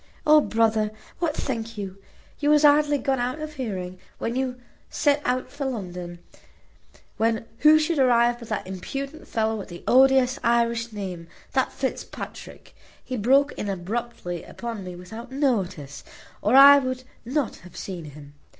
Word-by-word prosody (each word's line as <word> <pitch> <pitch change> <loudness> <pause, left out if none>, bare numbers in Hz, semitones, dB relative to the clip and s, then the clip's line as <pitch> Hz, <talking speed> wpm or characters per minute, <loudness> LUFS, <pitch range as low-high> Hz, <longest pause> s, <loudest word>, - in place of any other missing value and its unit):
O 305 0 +7
brother, 220 -3 +1 0.3
what 325 -3 0
think 230 -6 -4
you? 195 -1 -6 0.4
You 295 - +1
was 300 0 +5
hardly 295 0 +5
gone 270 -1 0
out 250 +5 -2
of 310 0 -6
hearing, 185 -9 -5 0.2
when 230 - -3
you 255 -1 -2 0.3
set 290 -1 +2
out 250 +1 -1
for 285 -1 -5
London, 180 -8 -5 1.0
when 225 0 +1
who 305 +1 +7
should 310 0 0
arrive 240 -2 +4
but 235 - -10
that 200 - -2
impudent 275 - -6
fellow 220 0 0
with 205 - -7
the 175 -1 -10
odious 265 +1 +5
Irish 235 0 +1
name 185 -5 -6 0.3
that 260 - +1
Fitzpatrick. 265 - -6 0.3
He 255 - -5
broke 270 +6 +3
in 205 - -5
abruptly 195 -1 -4
upon 230 -4 -6
me 180 -1 -7
without 220 +8 -10
notice, 190 - -1 0.4
or 215 +5 +2
I 280 +1 +10
would 255 -1 -3 0.2
not 270 +2 -2
have 180 - -14
seen 180 -4 -6
him. 145 -1 -12
235 Hz, 155 wpm, -25 LUFS, 195-270 Hz, 1.0 s, I